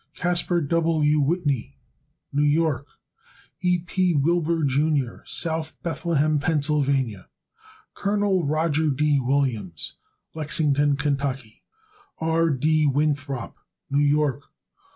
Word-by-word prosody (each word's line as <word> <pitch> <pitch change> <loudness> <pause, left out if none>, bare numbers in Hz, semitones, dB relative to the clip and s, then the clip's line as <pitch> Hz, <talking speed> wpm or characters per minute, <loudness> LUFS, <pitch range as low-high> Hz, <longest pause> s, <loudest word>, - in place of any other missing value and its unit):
Caspar 175 0 0
W. 155 -1 +2
Whitney, 140 - -1 0.6
New 145 - +1
York. 150 -2 +1 0.7
E. 180 0 +2
P. 180 0 0
Wilbur, 165 +2 +1
Jr., 140 -2 +1
South 160 -1 -2
Bethlehem, 155 -3 0
Pa. 155 +2 +1 1.4
Col. 200 -2 0
Roger 155 +1 +1
D. 145 +1 +2
Williams, 120 - -2 0.4
Lexington, 145 -2 +1
Ky. 140 -5 -2 0.6
R. 165 +1 +1
D. 155 +2 +2
Winthrop, 145 -3 -1 0.4
New 140 +1 +2
York. 145 -1 +1
150 Hz, 90 wpm, -24 LUFS, 140-165 Hz, 1.4 s, W